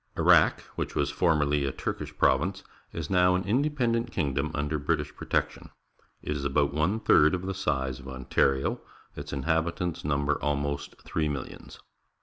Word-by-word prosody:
— - - -22
Iraq, - - +5
which - - -4
was 70 -1 0
former 80 -2 +2
ly 75 +1 +1
a 70 -2 0
Turkish - - -5
province, 95 +8 +2 0.3
is 80 0 -5
now 90 -1 +4
an 90 - 0
independent 120 0 0
kingdom 70 -2 -1
under 75 +1 -1
British 70 - -1
protection. - - -2 0.5
It - - -4
is 70 - -4
about 70 +1 +1
one 80 +9 +1
third 75 -5 +5
of 90 - -5
the 95 - -2
size 65 -8 -2
of 65 - -12
Ontario. 65 +1 0 0.3
Its - - -7
inhabitants 80 +4 -1
number 70 0 0
almost 70 -1 -2
three 75 -2 -1
millions. 70 -3 -7
75 Hz, 160 wpm, -28 LUFS, 70-90 Hz, 0.5 s, Iraq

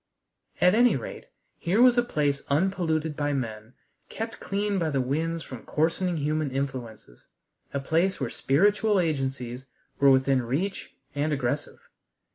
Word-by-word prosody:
At 180 +1 +5
any 240 +2 +5
rate, - - -7 0.3
here 185 +5 +1
was 250 0 +7
a 240 - +4
place 145 -11 0
unpolluted 160 -1 0
by 145 0 -1
men, 110 -3 -4 0.4
kept 225 +1 -5
clean 200 0 -1
by 165 -2 0
the 140 -3 0
winds 160 +6 -1
from 130 -3 -9
coarsening 170 +3 0
human 155 0 0
influences, 130 - -5 0.4
a 140 - -2
place 170 +7 +1
where 130 -5 -2
spiritual 205 +7 +2
agencies 135 -6 -2 0.3
were 140 - +6
within 130 0 +4
reach 150 +12 -3 0.2
and 145 +2 -1
aggressive. 140 0 -3
150 Hz, 140 wpm, -27 LUFS, 135-180 Hz, 0.4 s, was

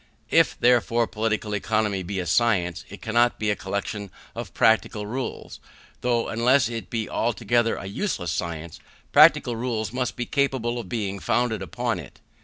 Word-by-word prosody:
If, - - +3
therefore, 120 -1 +3
Political 110 -1 -2
Economy 105 -1 0
be 95 +2 -4
a 90 - -2
science, 90 -3 +1
it 100 - -11
cannot 120 +2 +2
be 105 -1 0
a - - 0
collection 100 +1 -4 0.2
of - - -6
practical 110 -1 +2
rules; 125 +5 -5 0.4
though, 120 -1 +1
unless 120 +2 +3
it 115 -1 -6
be 115 -2 -2
altogether 120 0 +1
a - - -7
useless 95 - -2
science, 85 -1 -4 0.3
practical 120 - +6
rules 115 -2 -2
must 125 0 -2
be 120 - -3
capable 130 -4 0
of 105 -6 -8
being 100 -4 -3
founded 115 -2 0
upon 95 - -2
it. - - -12
110 Hz, 160 wpm, -25 LUFS, 100-120 Hz, 0.4 s, practical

